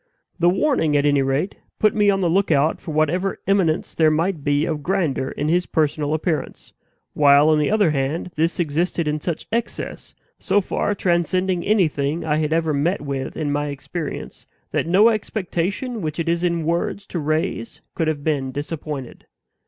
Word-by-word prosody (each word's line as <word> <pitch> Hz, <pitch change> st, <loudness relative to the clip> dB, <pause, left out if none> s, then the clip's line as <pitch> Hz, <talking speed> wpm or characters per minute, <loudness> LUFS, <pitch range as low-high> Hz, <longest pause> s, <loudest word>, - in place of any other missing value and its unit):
The 175 Hz, +1 st, +5 dB
warning, 180 Hz, -, +2 dB
at 145 Hz, -, +1 dB
any 145 Hz, -1 st, +3 dB
rate, 135 Hz, +8 st, -1 dB, 0.2 s
put 215 Hz, -1 st, +3 dB
me 210 Hz, -1 st, +3 dB
on 195 Hz, -1 st, +2 dB
the 180 Hz, -, +2 dB
lookout 165 Hz, -4 st, +2 dB
for -, -, -9 dB
whatever 160 Hz, +5 st, 0 dB
eminence 190 Hz, -5 st, +1 dB
there 160 Hz, -1 st, +4 dB
might 160 Hz, 0 st, 0 dB
be 145 Hz, +1 st, +2 dB
of 155 Hz, -3 st, -2 dB
grandeur 155 Hz, -7 st, 0 dB
in 150 Hz, -, -3 dB
his 175 Hz, +3 st, +1 dB
personal 150 Hz, -1 st, 0 dB
appearance; 160 Hz, 0 st, -3 dB, 0.4 s
while, 145 Hz, +1 st, +5 dB
on 155 Hz, -1 st, +4 dB
the 150 Hz, -, +1 dB
other 205 Hz, -6 st, +3 dB
hand, 150 Hz, +5 st, -2 dB
this 165 Hz, +3 st, 0 dB
existed 165 Hz, +1 st, 0 dB
in 150 Hz, 0 st, -1 dB
such 170 Hz, -1 st, -3 dB
excess, 230 Hz, 0 st, -4 dB, 0.2 s
so 205 Hz, -, +2 dB
far 205 Hz, +1 st, -1 dB
transcending 180 Hz, 0 st, +1 dB
anything 160 Hz, -7 st, +1 dB
I 150 Hz, -1 st, +1 dB
had 155 Hz, 0 st, -1 dB
ever 160 Hz, -1 st, +1 dB
met 160 Hz, +7 st, 0 dB
with 140 Hz, -2 st, -4 dB
in 145 Hz, -2 st, -1 dB
my 145 Hz, +1 st, -1 dB
experience, 145 Hz, +3 st, -6 dB, 0.2 s
that -, -, -1 dB
no 195 Hz, +6 st, +6 dB
expectation 215 Hz, +2 st, -2 dB
which 155 Hz, -1 st, -3 dB
it 165 Hz, -, -2 dB
is 170 Hz, +1 st, 0 dB
in 170 Hz, -2 st, 0 dB
words 170 Hz, +4 st, -1 dB
to 175 Hz, -, -4 dB
raise 155 Hz, -6 st, -2 dB
could 165 Hz, -, -1 dB
have 150 Hz, -2 st, -2 dB
been 140 Hz, -4 st, -1 dB
disappointed. 145 Hz, -2 st, -6 dB
160 Hz, 175 wpm, -22 LUFS, 150-180 Hz, 0.4 s, no